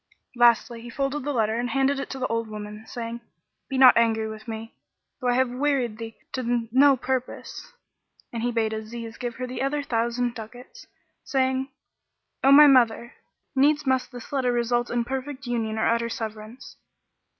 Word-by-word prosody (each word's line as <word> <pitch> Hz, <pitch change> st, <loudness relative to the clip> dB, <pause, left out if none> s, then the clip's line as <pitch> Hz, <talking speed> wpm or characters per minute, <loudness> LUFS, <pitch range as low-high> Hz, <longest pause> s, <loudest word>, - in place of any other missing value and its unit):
Lastly 235 Hz, -1 st, +3 dB
he 240 Hz, -, -9 dB
folded 275 Hz, +3 st, -2 dB
the 290 Hz, -, -2 dB
letter 225 Hz, -3 st, 0 dB
and 245 Hz, 0 st, -2 dB
handed 270 Hz, +3 st, +1 dB
it 275 Hz, -, -5 dB
to 270 Hz, -, -5 dB
the 255 Hz, -, -2 dB
old 230 Hz, -1 st, -1 dB
woman, 210 Hz, 0 st, -8 dB
saying, 235 Hz, 0 st, -6 dB, 0.5 s
"Be 270 Hz, -, -2 dB
not 260 Hz, -2 st, +8 dB
angry 225 Hz, -1 st, +2 dB
with 220 Hz, 0 st, -9 dB
me, 225 Hz, 0 st, -6 dB, 0.5 s
though 250 Hz, -, -3 dB
I 245 Hz, -, +3 dB
have 260 Hz, -1 st, +2 dB
wearied 250 Hz, -4 st, 0 dB
thee 225 Hz, -1 st, -7 dB, 0.2 s
to 240 Hz, -3 st, -1 dB
no 275 Hz, +2 st, +6 dB
purpose." 260 Hz, -, -4 dB, 0.6 s
And 230 Hz, -, -3 dB
he 245 Hz, +1 st, 0 dB
bade 225 Hz, -2 st, 0 dB
Aziz 225 Hz, +1 st, -7 dB
give 240 Hz, -2 st, -4 dB
her 255 Hz, -1 st, -4 dB, 0.2 s
other 290 Hz, +2 st, -1 dB
thousand 235 Hz, 0 st, -1 dB
ducats, 245 Hz, +2 st, -11 dB, 0.4 s
saying, 265 Hz, 0 st, 0 dB, 0.7 s
"O 270 Hz, -, +6 dB
my 295 Hz, +2 st, +10 dB
mother, 240 Hz, -4 st, +4 dB, 0.4 s
needs 290 Hz, +2 st, +3 dB
must 260 Hz, 0 st, 0 dB
this 245 Hz, -2 st, -10 dB
letter 260 Hz, -3 st, +1 dB
result 240 Hz, 0 st, 0 dB
in 240 Hz, -1 st, -1 dB
perfect 265 Hz, +1 st, -5 dB
union 225 Hz, -3 st, -2 dB
or 220 Hz, -, +1 dB
utter 235 Hz, 0 st, +1 dB
severance." 220 Hz, +1 st, -7 dB
240 Hz, 170 wpm, -25 LUFS, 230-265 Hz, 0.7 s, my